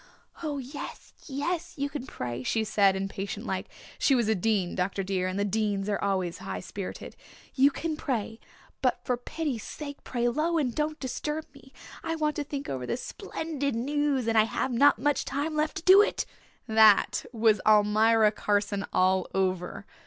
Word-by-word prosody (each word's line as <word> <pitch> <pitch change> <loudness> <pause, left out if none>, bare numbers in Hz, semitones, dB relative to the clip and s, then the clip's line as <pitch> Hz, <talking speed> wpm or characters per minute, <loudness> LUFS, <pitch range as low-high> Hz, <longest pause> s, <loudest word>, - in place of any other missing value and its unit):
'Oh 300 -3 -2
yes, 275 +2 -8
yes, 330 +5 -3
you 280 0 0
can 280 -2 -6
pray,' 120 0 -5
she 220 - 0
said 200 -3 +3
impatient 195 +1 -4
like - - -3 0.3
she 275 - +4
was 235 -4 +2
a 220 - +3
Dean, 195 -2 0
Dr. 195 +1 -1
dear, 185 -1 -1
and 185 +1 -3
the 200 - +1
Deans 205 -1 0
were 205 -1 -1
always 185 -4 -1
high 95 -1 -5
spirited 190 - -7 0.4
'you 275 +1 +5
can 315 +2 -3
pray, 230 -7 -3 0.4
but 255 -2 +1
for 250 - +1
pity's 255 0 -4
sake 285 +3 -8
pray 240 -1 -1
low 310 +7 +1
and 260 -6 0
don't 305 +2 -2
disturb 300 +4 -3
me. 275 -1 -16 0.3
I 325 0 -1
want 305 -2 0
to 295 - -1
think 285 0 -5
over 130 -2 -4
this 240 - -3
splendid 285 -5 -3
news 280 0 0
and 225 -1 +4
I 215 - +5
have 255 +3 -2
not 280 +3 +5
much 290 +5 +1
time 285 +3 -2
left 305 0 0
to - - -6
do 380 +3 +8
it.' - - 0 0.4
That 220 -2 +5
was 225 -3 +3
Almira 215 +1 +5
Carson 205 -1 -1
all 185 0 +2
over. 185 0 -1
235 Hz, 180 wpm, -28 LUFS, 200-290 Hz, 0.4 s, do